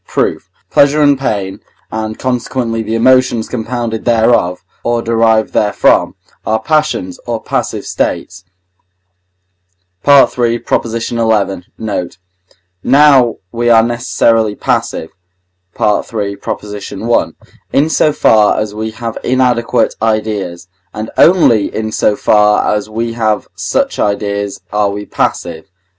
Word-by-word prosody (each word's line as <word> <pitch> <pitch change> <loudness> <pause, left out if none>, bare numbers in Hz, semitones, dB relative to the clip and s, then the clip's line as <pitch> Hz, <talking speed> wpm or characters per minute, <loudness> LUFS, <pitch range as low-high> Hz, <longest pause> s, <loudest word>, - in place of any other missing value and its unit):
Proof. - - -2 0.2
Pleasure 145 +2 +4
and 145 -1 +5
pain, 100 -8 -3 0.3
and 110 0 -4
consequently 125 -2 -2
the 110 +1 -3
emotions 130 -1 +3
compounded 115 -1 -4
thereof, 110 -7 +1 0.2
or 120 0 0
derived 115 -1 +2
therefrom, 105 -1 +2 0.3
are 110 0 0
passions, 150 - -1
or - - -2
passive - - -3
states 90 +1 -3 1.6
(III. 125 -4 +4 0.4
xi. 115 - -4 0.6
note); 100 -6 -4 0.7
now 135 -5 +5 0.2
we 120 0 0
are 115 -1 +6
necessarily 115 -2 +1
passive 80 - -2 0.7
(III. 105 -1 -1
i.), 105 +2 -2 0.4
in 145 +3 +2
so 155 -1 +2
far 110 -8 +3
as 105 -1 -3
we 110 +1 -4
have 115 +1 -6
inadequate 125 -3 +1
ideas; 105 -6 -2 0.3
and 110 +1 -5
only 155 - +4
in 110 0 -3
so 105 -1 +1
far 105 0 +3
as 105 0 -3
we 115 +1 -3
have 110 -3 -1
such - - -2
ideas 100 -1 -2
are 105 -1 +2
we 105 +1 -5
passive 85 -5 -2
(III. - - -43
110 Hz, 115 wpm, -14 LUFS, 105-120 Hz, 1.6 s, are